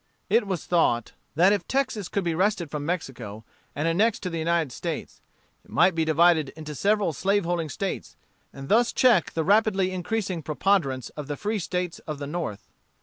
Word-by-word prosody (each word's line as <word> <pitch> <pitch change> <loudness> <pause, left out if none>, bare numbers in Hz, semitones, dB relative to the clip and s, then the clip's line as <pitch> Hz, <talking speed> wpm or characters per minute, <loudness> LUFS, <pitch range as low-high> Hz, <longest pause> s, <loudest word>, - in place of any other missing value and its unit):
It 230 -3 +3
was 185 -4 -3
thought 120 -10 +2 0.2
that 180 +6 +5
if 205 - -2
Texas 260 -8 -1
could 200 - -1
be 170 -1 0
wrested 180 -3 0
from 150 -1 -4
Mexico 120 - -4 0.3
and 145 +3 -1
annexed 205 +8 +2
to 180 - -3
the 165 - -3
United 165 -3 +1
States, - - -5 0.4
it - - -23
might 185 - +4
be 165 0 +1
divided 160 -1 +4
into 155 -1 -7
several 200 +1 +1
slaveholding 175 -2 0
States, 195 +5 -4 0.4
and 135 0 -9
thus 235 +6 +3
check 235 -10 +4
the 160 - 0
rapidly 195 -1 +3
increasing 185 -1 -2
preponderance 150 - 0
of 150 -2 -8
the 145 -1 -4
free 215 0 -2
States 180 -1 -3
of 155 -2 -4
the 140 - -5
North. 145 -9 -5
175 Hz, 180 wpm, -26 LUFS, 150-200 Hz, 0.4 s, that